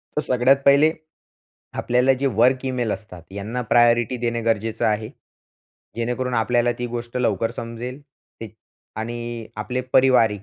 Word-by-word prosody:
तर 150 - +1
सगळ्यात 130 0 +3
पहिले 140 +3 +6 0.9
आपल्याला 125 +2 +3
जे 140 - +1
वर्क 125 +3 +3
इमेल 125 -4 -1
असतात 90 -5 -8
यांना 105 +5 -4
प्रायोरिटी 120 0 +4
देणे 120 -1 -2
गरजेचं 115 0 0
आहे. 110 0 -1 0.9
जेणेकरून 125 +2 -2
आपल्याला 120 +1 +2
ती 120 - -2
गोष्ट 120 0 -6
लवकर 115 -2 0
समजेल 120 +3 -7 0.4
ते 115 - -6 0.5
आणि 120 0 -5
आपले 125 +4 -3
पारिवारिक 115 -6 +4
120 Hz, 130 wpm, -22 LUFS, 115-125 Hz, 0.9 s, पहिले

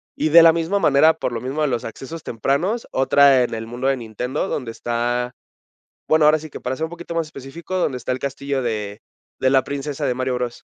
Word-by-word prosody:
Y 155 - 0
de 165 +2 +8
la 165 -1 +7
misma 170 +4 0
manera, 155 -2 +4
por 160 - -3
lo 115 - -4
mismo 135 +4 -3
de - - +2
los 120 -4 -2
accesos 135 +8 -8
tempranos, 145 - -1
otra 135 0 +5
en 120 - -3
el 110 0 -5
mundo 120 +3 -4
de 135 -1 +2
Nintendo, 125 - -4
donde 125 -5 -3
está 120 +1 -2 0.8
bueno, 155 -1 +4
ahora 155 +1 +5
sí 155 +1 -10
que - - -9
para 130 +1 -3
ser 160 - -2
un - - -8
poquito 175 0 -8
más 165 -1 -1
específico, 155 +6 -7
donde 145 -8 0
está 125 - -4
el 125 - -1
castillo 140 0 -3
de 105 -3 -3 0.4
de 130 - +3
la 135 -1 +4
princesa 140 +1 -4
de 125 - 0
Mario 130 0 -1
Bros. 125 -1 -4
135 Hz, 230 wpm, -21 LUFS, 125-155 Hz, 0.8 s, de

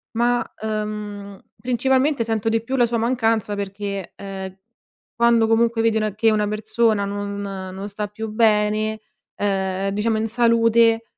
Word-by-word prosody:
ma, 240 +1 +2 0.2
uhm, 210 -2 -4 0.2
principalmente 260 +2 +1
sento 225 -1 -2
di 225 0 +1
più 260 +3 -3
la 245 - +5
sua 235 0 -1
mancanza 225 -3 0
perché, 200 -1 -5
uhm, 190 -1 -7 0.6
quando 235 -1 +4
comunque 230 0 +2
vedi 225 -1 +2
una 215 -2 -1
che 220 +1 +3
una 210 -1 +1
persona 215 0 +1
non 200 0 -4
non 195 0 -6
sta 210 +1 -4
più 220 +2 -6
bene, 215 0 +2 0.4
uhm, 195 -1 -1
diciamo, 220 +2 0
in 220 - -1
salute 230 0 +3
215 Hz, 145 wpm, -22 LUFS, 205-230 Hz, 0.6 s, la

